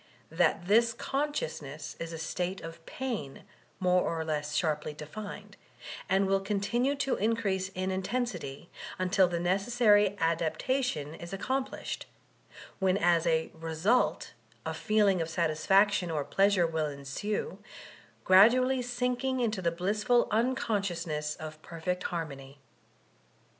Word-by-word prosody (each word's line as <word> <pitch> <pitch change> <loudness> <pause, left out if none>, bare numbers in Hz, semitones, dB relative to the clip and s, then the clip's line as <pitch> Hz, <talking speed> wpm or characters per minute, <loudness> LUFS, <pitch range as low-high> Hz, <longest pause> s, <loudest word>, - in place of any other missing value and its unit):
That 170 +1 +2
this 230 +3 +4
consciousness 160 - -3
is 165 0 -5
a 165 - -5
state 180 +3 -3
of 165 0 -9
pain, 230 - -5 0.4
more 180 -1 +3
or 165 -2 -2
lets 150 -1 -2
sharply 150 -2 -1
defined; 200 +8 -8 0.5
and 195 +1 +3
will 195 0 +2
continue 210 +7 0
to 275 -1 0
increase 200 -4 0
in 185 +1 -1
intensity 190 - -3 0.3
until 185 +1 +3
the 175 -1 -2
necessary 205 +2 +3
adaptation 165 - 0
is 170 +2 -9
accomplished, 260 +7 -3 0.7
when 190 0 +2
M 175 -2 +3
reenU 160 +6 0 0.3
a - - -2
feeling 205 -4 +2
of 165 - -2
satisfaction 180 +4 +2
or 150 -3 -1
pleasure 195 -2 +3
will 160 -2 -1
enrae, 145 - -4 0.7
gimdually 250 +7 +6
sinking 250 +1 -1
into 220 -5 0
the 170 - +2
blissful 210 +8 +1
unconsdomiess 195 -10 -1
of 155 0 -8
perfect 175 +3 -4
bamiociy. 140 -5 -5
185 Hz, 115 wpm, -30 LUFS, 165-215 Hz, 0.7 s, gimdually